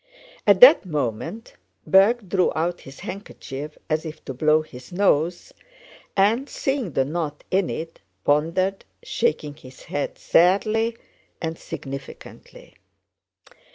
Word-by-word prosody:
At - - +5
that - - +10
moment 160 - -4 0.3
Berg 200 +3 +4
drew 185 0 +2
out 170 +2 -1
his 135 0 -12
handkerchief 150 -6 -7
as 155 -1 0
if 160 -1 -9
to 135 - -5
blow 155 +4 +3
his 125 -2 -13
nose 175 -3 +1 0.6
and, 225 +8 +3
seeing 270 - -2
the 135 - +2
knot 150 -1 -4
in 190 -1 +2
it, 165 +1 -6 0.2
pondered, 170 +7 +1 0.2
shaking 460 - -1
his 130 -3 -15
head 145 - -4
sadly 215 +6 +2 0.4
and 160 -1 -3
significantly. 135 -3 -10
165 Hz, 120 wpm, -23 LUFS, 150-195 Hz, 0.6 s, that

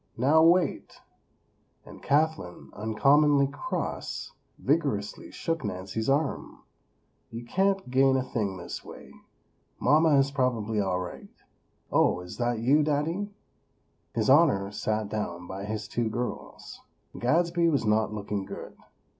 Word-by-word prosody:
"Now, 145 +7 +4
wait!" 170 -1 +2 0.9
and - - -13
Kathlyn, 150 - -1
uncommonly 140 +7 +3
cross, 140 +1 -4 0.3
vigorously 135 -9 -1
shook 165 -2 -3
Nancy's 100 +3 -3
arm. 145 +2 -1 0.7
"You 115 +1 -8
can't 195 +7 0
gain 135 +1 +4
a 130 - 0
thing 105 -7 -3
this 85 - -7
way. - - -12 0.7
Mama 150 +2 +4
is 135 0 +2
probably 115 -6 0
all 95 -2 0
right. 90 -1 -7 0.6
Oh, 90 - +3
is 90 0 -9
that 120 -1 0
you, 135 +7 +3
Daddy?" 155 +7 -1 0.9
His 110 -2 0
Honor 130 -9 +4
sat 110 0 -2
down 90 -5 -4
by 95 +2 -6
his 105 0 -4
two 120 -1 -1
girls. 120 +2 -6 0.4
Gadsby 170 +6 +2
was 140 -7 0
not 105 0 +2
looking 105 -1 -3
good. - - -9
125 Hz, 125 wpm, -27 LUFS, 105-150 Hz, 0.9 s, Now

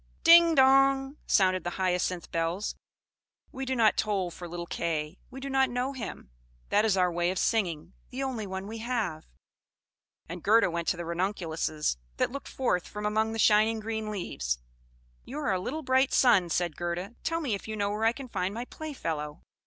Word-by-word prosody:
"Ding, 335 0 +8
dong!" 270 +1 +4
sounded 185 -3 +3
the 175 - -2
Hyacinth 180 -1 -1
bells. 165 +5 -1 0.8
"We 265 0 -5
do 260 0 -1
not 225 -3 +4
toll 195 -5 0
for 175 +1 -8
little 170 0 -5
Kay; 165 -1 -3
we 265 - -9
do 275 - -6
not 265 -1 +2
know 250 +3 -2
him. 225 - -7 0.4
That 210 +2 +3
is 205 -3 +2
our 180 -1 +3
way 175 +1 0
of 185 - -2
singing, 175 -7 0 0.2
the 260 +2 -4
only 240 -6 -3
one 190 0 -5
we 220 +2 -6
have." 220 -9 -2 1.0
And 175 +1 -7
Gerda 215 -1 +4
went 170 0 -3
to 180 - +1
the 170 - -5
Ranunculuses, 170 - -1 0.2
that - - +1
looked 280 +2 -7
forth 180 -9 -1
from 210 0 -6
among 220 +1 +1
the - - -4
shining 220 +1 +4
green 220 0 -3
leaves. 70 - -3 0.7
"You 270 - -8
are 290 -9 0
a 185 - 0
little 300 +12 -4
bright 260 0 +3
sun!" 190 -9 +5
said 170 -2 0
Gerda. 175 +4 -4
"Tell 330 0 0
me 280 -9 -1
if 200 - -5
you 220 - -4
know 205 -1 -1
where 215 +2 -1
I 225 - +5
can 265 +2 -8
find 195 -3 -2
my 240 +2 -4
playfellow." 165 - -5
210 Hz, 190 wpm, -28 LUFS, 175-250 Hz, 1.0 s, Ding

